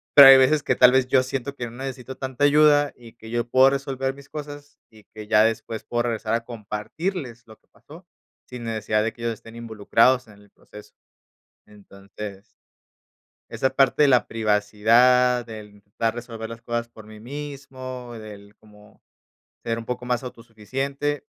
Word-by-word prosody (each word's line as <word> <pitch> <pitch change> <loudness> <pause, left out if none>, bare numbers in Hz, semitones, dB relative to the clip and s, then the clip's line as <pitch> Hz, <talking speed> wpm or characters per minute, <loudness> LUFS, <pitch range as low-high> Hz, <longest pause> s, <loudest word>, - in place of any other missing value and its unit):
Pero 140 -2 +11
hay 135 - +10
veces 140 +3 +3
que - - +1
tal 125 0 +7
vez 130 -1 +2
yo 130 0 +4
siento 135 +1 -5
que 120 - -5
no 115 - -8
necesito 130 -1 -7
tanta 130 +1 -4
ayuda 145 0 +4
y 115 -2 -15
que 110 -1 -13
yo 120 0 -2
puedo 130 +2 +5
resolver 135 -1 -3
mis 140 0 -16
cosas, 145 -1 -9
y 110 -2 -19
que 105 -1 -10
ya 105 0 +5
después 115 0 -2
puedo 120 0 -2
regresar 115 -2 -2
a 115 0 0
compartirles 120 - -5
lo 110 -1 -16
que - - -41
pasó, 170 +5 -17 0.4
sin 125 -2 -8
necesidad 110 -1 -1
de 115 - -2
que 115 - -15
ellos 115 -1 -1
estén 115 +2 -15
involucrados 115 +2 +1
en 105 - -16
el 105 -1 -21
proceso. 105 +1 -16 0.7
Entonces 100 0 -11 1.1
esa 130 - 0
parte 135 +2 +3
de 145 - +5
la 125 -2 +4
privacidad, 115 +3 +3
del 110 -2 -10
intentar 105 +3 -3
resolver 115 -2 -7
las 115 0 -10
cosas 120 0 -3
por 110 -2 -15
mí 110 0 -13
mismo, 130 -2 -8
del 105 -2 -11
cómo 105 -1 -21 0.6
ser 115 -1 -2
un 115 - -7
poco 125 0 -5
más 125 +1 -1
autosuficiente, 130 +5 -4
120 Hz, 175 wpm, -23 LUFS, 110-135 Hz, 1.1 s, Pero